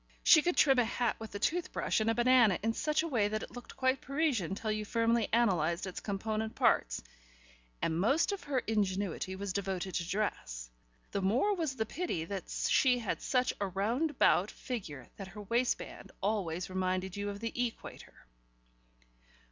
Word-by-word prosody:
She 315 - +8
could 350 +3 0
trim 270 -4 +5
a - - +5
hat 235 0 -1
with 220 -2 -8
a - - 0
tooth 340 - 0
brush - - 0
and 220 +1 +1
a 225 - +2
banana 240 -5 +5
in 225 +1 +1
such 305 +5 0
a - - -2
way 230 -9 +2
that 215 +1 -2
it - - -9
looked 245 -1 -10
quite 260 0 +1
Parisian 270 - 0
till 215 +1 -2
you 215 0 -1
firmly 230 +1 +1
analysed 180 -7 +2
its 190 - -5
component 220 +2 -3
parts, - - +2 0.8
and 160 0 +1
most 275 - +3
of 400 - -5
her 280 -2 -1
ingenuity 195 -3 -1
was 195 0 -4
devoted 190 -1 -2
to 170 0 -2
dress: - - -3 0.4
the 200 - -1
more 245 - +2
was 320 -7 -2
the 220 - -1
pity 245 - -3
that 195 +1 -5
she 255 -2 +3
had 230 -4 -3
such 255 -1 +1
a 200 - +1
round 220 - 0
about 215 -8 +3
figure 165 - -6
that 195 - -7
her 205 +2 -9
waistband 235 +4 -1
always 185 -4 -1
reminded 185 0 -1
you 205 0 -3
of 200 0 -6
the 230 +1 -4
equator. 240 - -5
215 Hz, 180 wpm, -32 LUFS, 190-250 Hz, 0.8 s, She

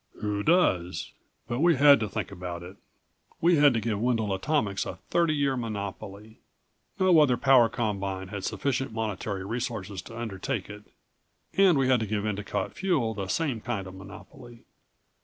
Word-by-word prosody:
"Who 105 -1 -2
does? 95 - +1 0.4
But 120 +1 -2
we 170 +1 +4
had 140 0 +7
to 110 -2 -2
think - - -4
about 90 -2 -6
it. 95 +3 -11 0.6
We 170 0 +4
had 145 -1 +6
to - - +2
give 110 -2 -2
Wendel 115 -4 +1
Atomics 105 -2 0
a - - -5 0.2
thirty 170 -3 +2
year 140 -2 +1
monopoly. 105 -2 -6 0.6
No 185 -3 +5
other 130 -5 +4
power 130 -3 +5
combine 100 -5 -3
had 100 -2 -6
sufficient 135 -2 -2
monetary 105 -3 -3
resources 105 -4 -4
to 115 - -11
undertake 110 0 -4
it. 105 0 -11 0.7
And 190 -5 +5
we 135 -1 +2
had 130 -2 +4
to 110 - -3
give 105 0 -2
Endicott 105 -1 -3
Fuel 155 -12 0
the 100 -3 -5
same 135 - -1
kind 110 -5 -3
of 95 - -9
monopoly. 110 +5 -13
110 Hz, 165 wpm, -27 LUFS, 100-135 Hz, 0.7 s, had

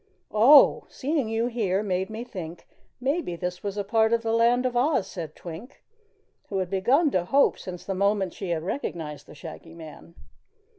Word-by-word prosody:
"Oh! 255 +7 +7
Seeing 280 -4 -2
you 225 +1 0
here 210 -5 0
made 190 -1 -1
me 220 +2 -5
think 175 -8 -8 0.3
maybe 270 - -1
this 180 +1 -4
was 200 0 -4
a 205 - -1
part 220 +2 +2
of 230 0 +1
the 225 0 0
Land 235 +2 +3
of 250 -1 -1
Oz," 255 -4 +2
said 165 -5 -7
Twink, 180 +10 -10 0.7
who 195 - -2
had 185 -1 -2
begun 270 - +3
to 180 -5 +1
hope 275 +9 +3
since 180 -2 -8
the 195 - -2
moment 200 -1 +1
she 195 - -6
had 165 -2 -1
recognized 155 - -5
the - - -13
Shaggy 165 +2 -10
Man. 165 +1 -12
200 Hz, 185 wpm, -26 LUFS, 175-240 Hz, 0.7 s, Oh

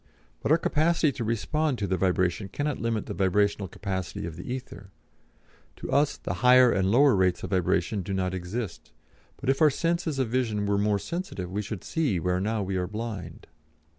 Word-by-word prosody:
But - - -1
our 160 - +7
capacity 165 -1 +2
to 130 -3 -5
respond 130 +6 0
to 105 - -2
the 95 - 0
vibration 95 +1 0
cannot 145 +7 -2
limit 115 -2 -1
the - - -5
vibrational 100 +1 +1
capacity 95 -2 -4
of 85 -2 -6
the 90 +8 -7
ether; 125 -6 -7 0.9
to - - -7
us 145 +1 +2
the - - -4
higher 125 -1 +7
and 95 -1 +1
lower 135 +4 +5
rates 90 -2 +1
of - - -5
vibration 95 +2 +1
do 100 - -6
not 95 -1 -1
exist, 95 +2 -5 0.4
but - - -8
if 135 +3 +2
our 155 - +7
sense 170 +4 -1
of 150 -4 -1
vision 110 -4 0
were 100 0 +1
more 105 0 +2
sensitive 100 - -5
we 100 +2 -1
should 105 -1 -6
see 140 - 0
where 90 +2 0
now 110 +1 -1
we 95 0 -2
are 90 -1 -1
blind. 105 -6 -6
105 Hz, 195 wpm, -27 LUFS, 95-130 Hz, 0.9 s, our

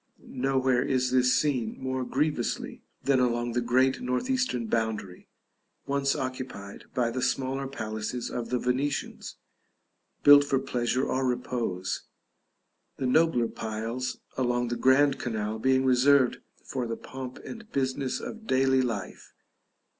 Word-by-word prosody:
Nowhere 130 -1 +1
is 130 -1 +1
this 125 0 +4
seen 125 -7 0
more 130 0 -2
grievously 140 -1 -1 0.2
than 140 -2 +3
along 120 -1 +1
the 120 +1 0
great 130 +2 +2
north 125 - -1
eastern 255 - 0
boundary, 110 -5 -2 0.6
once 140 0 +1
occupied 130 -6 -6
by 120 -2 +1
the 130 +2 -3
smaller 135 +1 -1
palaces 110 -1 -4
of 115 -2 -4
the 125 - +1
Venetians, 130 +4 -2 0.9
built 145 0 +9
for 140 -1 +1
pleasure 125 -1 0
or 130 - 0
repose; 120 -7 -2 0.9
the 130 - -2
nobler 125 -3 +3
piles 115 +4 -4 0.2
along 120 -1 +1
the 120 - -1
grand 135 +3 +4
canal 110 -2 -3
being 130 +2 +3
reserved 130 0 +4 0.3
for 125 -3 -3
the 115 - -3
pomp 130 -1 -8
and 230 -2 -9
business 130 0 -1
of 225 0 -8
daily 130 0 +3
life. 115 -6 -4
130 Hz, 130 wpm, -28 LUFS, 120-135 Hz, 0.9 s, built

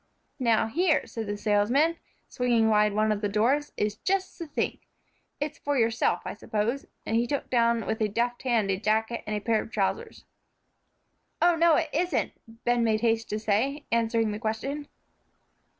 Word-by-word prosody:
"Now, 230 -3 +3
here," 315 +8 +1
said 225 -2 -6
the 205 0 -3
salesman, 235 +11 +2 0.3
swinging 235 -3 +2
wide 210 -1 +3
one 215 +1 +2
of 210 -1 -1
the 205 - 0
doors, 255 +8 +1
"is 210 0 -1
just 375 +8 -1
the 335 - -5
thing. 290 - -2 0.6
It's 295 +1 -4
for 290 -1 -1
yourself, 225 -2 +1
I - - -4
suppose," 220 +5 -2 0.2
and 225 - -1
he 240 +1 +1
took 285 +1 -3
down 235 -2 +2
with 220 - -2
a 215 - +3
deft 240 +4 -1
hand 230 -6 +1
a 190 - 0
jacket 220 +2 0
and 215 - -1
a - - -1
pair 220 +1 +1
of - - -9
trousers. 220 - -2 1.1
"Oh, 345 0 +4
no, 330 -1 +5
it 320 -1 0
isn't," 345 -1 0 0.3
Ben 240 0 +2
made 220 -1 +1
haste 225 -1 +1
to 210 - -1
say, 225 +8 0
answering 225 -1 +1
the 210 - -4
question. 270 +7 -3
230 Hz, 180 wpm, -27 LUFS, 215-280 Hz, 1.1 s, no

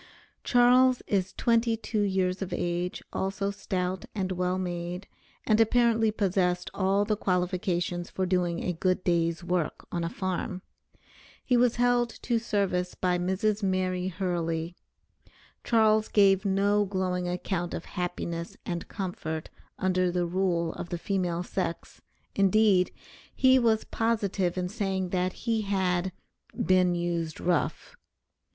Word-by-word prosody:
Charles 250 +1 +5
is 190 -2 0
twenty 230 -1 +2
two 215 -1 -2
years 190 -2 0
of 190 - -4
age, 175 +1 -2
also 195 +1 -1
stout, 185 -2 -3
and 190 -2 -1
well 180 0 0
made, 175 0 -4 0.4
and 215 0 +4
apparently 230 -1 +3
possessed 185 -4 0
all 195 +1 +2
the 215 0 +1
qualifications 180 -2 -1
for 190 - -2
doing 180 -2 0
a 180 - -1
good 185 +2 0
day's 170 -1 +1
work 175 -3 -2
on 170 -1 -2
a 165 - -1
farm. 185 0 -3 0.8
He 250 - +3
was 240 -1 +3
held 245 0 +2
to 235 -2 +1
service 195 -5 -1
by 180 -1 0
Mrs. 195 +4 0
Mary 185 -1 0
Hurley. 170 -2 -2 0.9
Charles 220 -2 +3
gave 195 -1 +4
no 200 +1 +2
glowing 185 -2 -1
account 175 0 -2
of 170 - -6
happiness 170 -2 -4
and 175 -2 -4
comfort 160 -5 -5 0.3
under 185 -1 +1
the 175 0 0
rule 170 -2 0
of 170 - -7
the 175 - -2
female 180 -2 -1
sex, 180 -2 -4 0.3
indeed, 195 -1 +4 0.4
he 260 0 +5
was 225 -3 +2
positive 205 -6 -1
in 180 -1 -1
saying 190 -2 -2
that 185 0 0
he 225 -2 +1
had 190 -2 0 0.5
"been 185 -1 +3
used 170 -2 -2
rough." 175 0 -1
185 Hz, 135 wpm, -28 LUFS, 180-205 Hz, 0.9 s, Charles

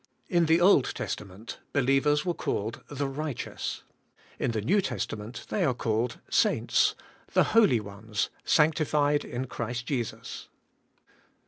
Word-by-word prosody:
In 170 -5 +3
the 165 +1 +5
Old 175 -7 +4
Testament, 100 +2 -6
believers 145 +2 +3
were 175 - +1
called 110 -6 -3
the 145 -1 -2
right 145 -1 -4
eous; - - -5 0.6
in - - 0
the 110 -2 -1
New 195 - +3
Testament 110 - -4
they 205 - 0
are 130 -7 +2
called 115 0 -1
saints, - - +2 0.4
the - - +5
holy 210 - +5
ones, 105 +1 -4
sanctified 150 -2 +3
in 125 +2 -4
Christ 120 0 -4
Jesus. 115 -4 -4
130 Hz, 130 wpm, -28 LUFS, 115-150 Hz, 0.6 s, the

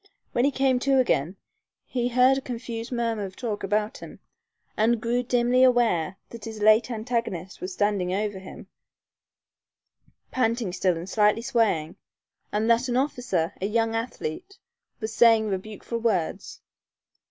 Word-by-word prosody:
When 240 - +2
he - - +4
came 265 -2 +2
to 270 +1 +2
again, 185 - +1 0.5
he 245 -2 -1
heard 250 +2 +4
a 270 - -2
confused 235 -2 -6
murmur 230 -3 -1
of 190 -1 -7
talk 220 -5 -4
about 210 +2 -1
him, - - -11 0.6
and 225 +2 +2
grew 235 +2 0
dimly 250 +1 +2
aware 225 -9 +2
that 230 -3 -9
his 220 -1 -7
late 215 +3 +5
antagonist 220 -6 -3
was 185 +1 -5
standing 200 -2 0
over 205 0 -2
him, 190 - -11 1.7
panting 230 -6 0
still 185 -2 +1
and 170 +2 -7
slightly 210 +2 +2
swaying, 200 -10 0 0.5
and 215 +2 0
that 235 +2 +3
an 245 - +1
officer, 245 - -1
a 195 - 0
young 225 +1 0
athlete, 230 - -5 0.4
was 220 -1 -4
saying 225 -2 +5
rebukeful 210 +4 -4
words. 205 -8 -2
225 Hz, 145 wpm, -25 LUFS, 200-245 Hz, 1.7 s, late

